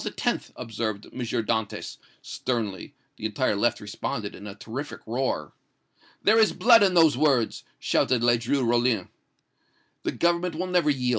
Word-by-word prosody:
observed 110 -3 -4
M. - - -8
Dantès, 110 -2 -2 0.3
sternly. 110 -7 -3 0.2
The - - -6
entire 110 +1 0
left 120 +4 +1
responded 105 0 -4
in 100 - -10
a 100 - -8
terrific 120 +7 -7
roar. 125 +4 -2 0.7
"'There 220 +2 +5
is 220 - +4
blood 230 -1 +6
in 190 -3 +3
those 160 -5 +6
words!' 135 -5 +1
shouted 125 -2 +1
Ledru 120 +2 +2
Rollin. 120 -4 +1 0.9
"'The - - -2
Government 170 0 +1
will 180 +4 -2
never 180 -4 +2
yield!' 130 -3 0
120 Hz, 140 wpm, -26 LUFS, 110-155 Hz, 0.9 s, blood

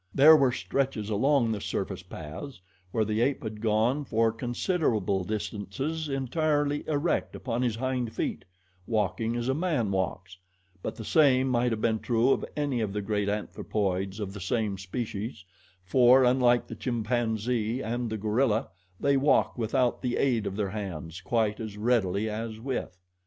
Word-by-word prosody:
There 155 +4 +9
were 135 -4 +4
stretches 125 -5 -2
along 125 +2 +3
the 105 -2 -3
surface - - -3
paths 80 - -8 0.3
where 110 +3 0
the 110 +1 0
ape 135 +2 +1
had 110 -1 -6
gone 115 +6 +2
for 115 -3 +2
considerable 115 - 0
distances 110 - -3
entirely 145 +2 0
erect 155 +2 0
upon 120 -1 -2
his 120 -4 +1
hind 125 -1 -2
feet - - -3 0.4
walking 115 +1 0
as 120 0 -2
a 130 - +2
man 150 - 0
walks; 95 -1 -2 0.5
but - - -4
the 110 - -8
same 135 -3 +4
might 120 -1 +2
have 110 -1 -2
been 110 -1 +1
true 120 +3 +2
of - - +1
any 140 -5 0
of 105 -3 -2
the 105 - -2
great 105 -1 0
anthropoids 100 -1 -2
of 100 -2 -4
the 100 - -8
same 105 +2 0
species, 105 +1 -5 0.4
for, 125 +6 +6
unlike 125 -1 +4
the - - -8
chimpanzee 115 0 -1
and 120 +1 -2
the 110 - -3
gorilla, 110 +3 +1 0.3
they 140 -1 +3
walk 140 +2 +3
without 120 +1 0
the 125 -1 -1
aid 120 -6 +1
of 95 - -4
their 100 -2 -1
hands 90 -5 -5
quite 110 +1 0
as 110 -2 -6
readily 110 -3 +1
as 110 +1 -4
with. 120 -7 -4
115 Hz, 160 wpm, -28 LUFS, 105-130 Hz, 0.5 s, There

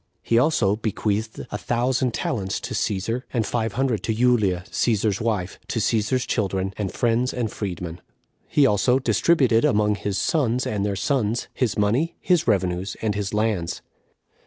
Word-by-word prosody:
He 115 - +3
also 115 -8 +2
bequeathed 110 0 -2
a 105 - -3
thousand 125 +1 0
talents 95 -6 -2
to - - -5
Cæsar, 105 +5 -1
and 115 -4 0
five 115 +1 -1
hundred 125 -5 0
to 110 - 0
Julia, 110 -7 +2
Cæsar's 110 -2 +1
wife, 105 -5 -2
to - - -3
Cæsar's 115 +3 +1
children, 95 -3 -1
and 100 -3 -3
friends 120 +2 +1
and 115 -4 -2
freed 95 -5 -4
men. 85 0 -6 0.5
He 145 - +4
also 125 +2 +3
distributed 125 - +3
among 105 0 +3
his 100 -1 -3
sons 125 - +1
and 105 -2 -1
their 100 -1 -1
sons 110 +2 0
his 120 -6 -1
money, 120 +12 +1
his 180 -6 +2
revenues, 95 -3 0
and 110 -2 +1
his 100 -1 -3
lands. 105 -5 -1
110 Hz, 160 wpm, -23 LUFS, 100-125 Hz, 0.5 s, He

